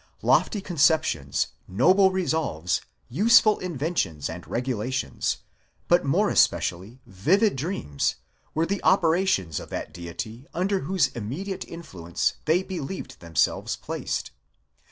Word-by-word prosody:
Lofty 205 - +3
conceptions, 155 - +1 0.2
noble 185 - +5
resolves, 160 - -1 0.3
use 215 - +6
ful 215 -1 +2
inventions 150 - -2
and 85 +1 -9
regulations, 125 - -2 0.5
but - - +4
more - - +2
especially 95 +9 +1
vivid 185 - +2
dreams, 130 - -2 0.4
were 160 +2 +2
the 200 +2 -2
operations 170 - +2
of - - -10
that - - -5
Deity 110 +9 -7
under 190 +2 +1
whose 160 -2 +1
immediate 140 - -5
influence 95 - -3
they 170 +4 +3
believed 190 -2 -6
themselves 85 -3 0
placed. - - -4
150 Hz, 115 wpm, -25 LUFS, -, 0.5 s, use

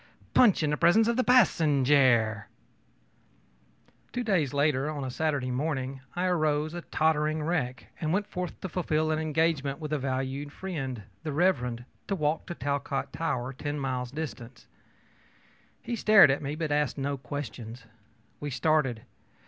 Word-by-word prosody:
punch 215 -10 +5
in 150 - +1
the 150 - 0
presence 195 +7 +4
of 235 - +2
the 255 - +2
passenjare!ö 140 - +4 1.7
Two 245 - -2
days 180 - +1
later, 145 0 +1
on 145 -3 -4
Saturday 145 -3 -1
morning, 135 -1 -2
I 180 +1 0
arose, 155 -3 +1
a 175 - -5
tottering 155 -1 0
wreck, 150 -6 -2 0.2
and 155 -1 0
went 200 +4 +1
forth 180 -3 -5
to 190 - -4
fulfil 155 -2 0
an 155 - 0
engagement 155 -3 0
with 155 -2 -5
a 150 - 0
valued 135 +2 -3
friend, 135 - -5 0.2
the 155 - -4
Rev. 180 +5 +3
Mr., 120 -1 -5 0.2
to 195 - 0
walk 155 -2 -1
to 175 - -5
the - - -29
Talcott 140 0 -2
Tower, 130 -5 -2
ten 145 +2 -4
miles 130 -2 -2
distant. 125 -5 -7 1.2
He 240 - -3
stared 215 -8 +7
at 135 - -1
me, 145 +1 -3
but 155 -1 -3
asked 145 -3 +1
no 140 +1 -1
questions. 125 -3 -7 0.6
We 145 - -4
started. 135 -3 +1
150 Hz, 155 wpm, -28 LUFS, 130-160 Hz, 1.7 s, stared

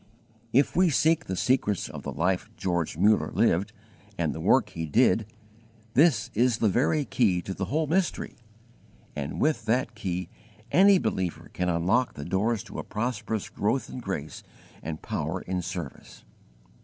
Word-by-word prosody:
If 135 +5 +3
we 180 0 +4
seek 160 +2 +2
the 95 - -3
secrets 105 -3 +1
of - - -8
the - - -5
life - - 0
George 85 -4 -1
Muller 105 +4 +3
lived - - +2 0.5
and - - 0
the - - -7
work - - +3
he 80 -1 -5
did, 90 +8 +3 0.7
this 155 +5 +3
is 120 +1 +2
the 110 - +2
very 145 +7 +1
key 100 -4 +2
to 95 - -4
the 95 - -3
whole 155 - 0
mystery, 175 +4 -1 0.8
and 75 0 -4
with 145 -7 +1
that 125 +2 +1
key 90 -4 -3 0.4
any 195 +2 +6
believer 95 - -2
can 90 0 -1
unlock 90 +9 +1
the 70 - -7
doors 100 +5 0
to - - -8
a - - -4
prosperous 110 -2 -3
growth 130 +6 -1
in - - -6
grace 95 -10 -5 0.4
and 80 +1 -6
power 80 +5 -3
in 90 0 -3
service. 90 -5 -7
105 Hz, 160 wpm, -27 LUFS, 90-130 Hz, 0.8 s, any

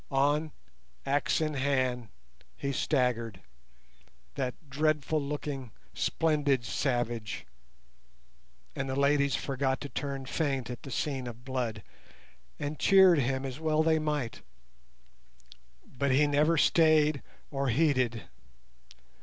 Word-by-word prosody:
On, 145 +3 +1 0.5
axe 145 +3 +1
in 155 -1 0
hand, 130 -3 0 0.5
he 140 - -2
staggered, 125 -8 0 0.9
that 130 -3 -2
dreadful 150 +1 0
looking, 140 -3 -4 0.2
splendid 145 -6 +1
savage, 120 -4 -2 1.3
and 135 0 -3
the 130 - -2
ladies 140 -1 +3
forgot 135 -1 -1
to 145 - -5
turn 135 -1 -4
faint 135 -4 -1
at 120 - -7
the - - -9
scene 135 -1 -2
of 120 +1 -9
blood, 120 -5 -3 0.7
and 145 +1 -4
cheered 190 -4 +6
him, 130 +1 -1
as 130 +1 -5
well 155 -1 +2
they 160 0 +3
might, 150 -6 -2 1.4
but 140 +2 -2
he 135 +3 +4
never 150 +3 +3
stayed 155 -2 +4 0.3
or 135 -2 -1
heeded. 130 -4 +1
140 Hz, 110 wpm, -29 LUFS, 130-150 Hz, 1.4 s, cheered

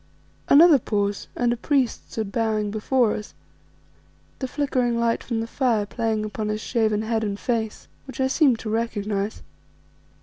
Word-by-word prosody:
Another 310 0 +8
pause, 205 -2 -2
and 240 -1 +1
a - - -2
priest 265 -1 0
stood 215 -3 -3
bowing 215 -2 0
before 220 +2 +1
us, 210 - -7 1.0
the 260 - -2
flickering 255 -4 0
light 235 0 +1
from 230 -2 -2
the - - -2
fire 230 -3 0
playing 220 0 -1
upon 215 0 -4
his 215 0 -1
shaven 215 -2 0
head 220 0 -1
and 205 -1 -3
face, 225 -3 -2 0.2
which 265 -2 -9
I 265 - +3
seemed 265 -2 +3
to 220 - -5
recognize. 210 -2 -2
225 Hz, 160 wpm, -24 LUFS, 215-245 Hz, 1.0 s, Another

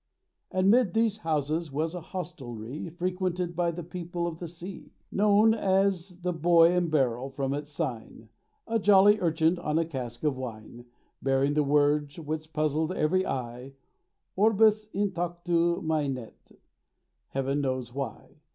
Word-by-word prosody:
And 185 +1 +3
'mid 235 -5 +3
these 225 -2 +2
houses 155 -1 -1
was 160 +4 -1
a 180 - -5
Hostelrie 150 -6 -6
Frequented 180 0 -2
by 175 0 +1
the 170 +1 -5
people 175 0 -4
of 170 -1 -4
the 175 - -5
sea, 175 +3 -9 0.2
Known 210 +2 +4
as 190 -3 0
the 180 0 -1
Boy 165 +1 +5
and 180 -1 +1
Barrel, 135 -4 +1
from 135 0 -2
its 145 +1 -4
sign: 120 -7 -5 0.4
A 225 0 0
jolly 205 +1 +6
urchin 165 0 +2
on 155 -2 -1
a 165 - +2
cask 125 -6 -6
of 150 -3 +1
wine 120 -1 -8 0.4
Bearing 135 +1 +2
the 150 - +3
words 145 +1 +2
which 155 0 -5
puzzled 155 +1 0
every 185 +3 +1
eye— 125 +1 -5 0.6
Orbus 215 +1 +4
In 200 0 0
Tactu 175 0 0
Mainet 140 -7 -3 0.7
Heaven 135 +1 -1
knows 130 -3 -2
why. 135 -5 -6
165 Hz, 145 wpm, -28 LUFS, 140-180 Hz, 0.7 s, jolly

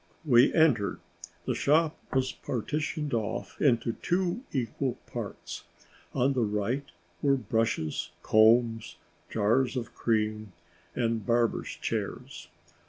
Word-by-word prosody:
We 125 -2 +6
entered. 140 -11 +3 0.5
The - - 0
shop 155 +2 +2 0.2
was 130 -1 +1
partitioned 150 +4 -3
off 110 -2 -3
into 115 -4 +3
two 180 +5 0
equal 130 0 -1
parts. - - -7 0.5
On 135 +3 +3
the 130 - 0
right 110 +6 -1 0.4
were 140 -1 +4
brushes, 110 - -1
combs, 115 +1 +4 0.3
jars 120 +5 +2
of 115 -1 -4
cream, 110 -3 -1 0.4
and 115 -2 0
barbers' 120 -1 0
chairs. - - -4
120 Hz, 105 wpm, -29 LUFS, 110-140 Hz, 0.5 s, We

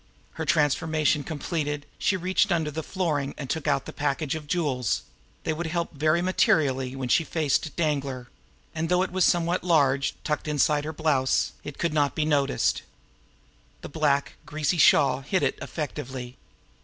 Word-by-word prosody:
Her - - -5
transformation 155 0 +2
completed, 145 -2 -3
she 190 - +1
reached 185 +3 +1
in 175 - +3
under 160 -2 -1
the 160 +2 -4
flooring 150 -6 -2
and 140 - -5
took 155 +2 -3
out 140 -2 +1
the - - -8
package 145 0 -1
of 155 -2 -6
jewels 140 - 0 0.4
they 160 - 0
would 165 +2 -3
help 170 +1 -2
very 155 +4 +2
materially 135 -8 +2
when 135 -1 -3
she 165 - +3
faced 155 -1 -1
Danglar! 140 -6 -1 0.5
and, 160 0 -2
though 180 +1 +3
it 190 - -4
was 185 0 +2
somewhat 175 +1 +1
large, 140 -6 +2
tucked 150 0 -2
it - - -1
inside 150 0 +2
her 155 - -3
blouse. 140 -5 +1
It 145 - -8
could 170 -2 -1
not 145 -2 +1
be 155 - 0
noticed. 140 -3 +1 1.0
The - - -8
black, 145 -2 0
greasy 155 +3 -1
shawl 140 -2 +5
hid 180 +7 0
it - - 0
effectively. 130 -4 -5
150 Hz, 170 wpm, -26 LUFS, 140-165 Hz, 1.0 s, shawl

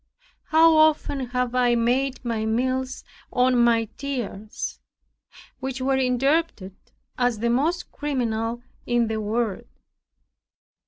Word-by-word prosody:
How 325 0 +5
often 300 -4 +2
have 250 0 -1
I 245 -1 +3
made 255 +3 0
my 230 -2 -1
meals 255 +3 -1 0.3
on 250 0 +3
my 235 -1 +3
tears, 235 -7 -5 0.8
which 265 0 -4
were 265 +1 +1
interpreted 260 - 0 0.4
as 245 -2 +2
the 235 +2 0
most 320 +8 0
criminal 240 -5 -2 0.2
in 240 -2 +1
the 220 -1 -2
world! 215 -1 -2
250 Hz, 110 wpm, -24 LUFS, 230-270 Hz, 0.8 s, How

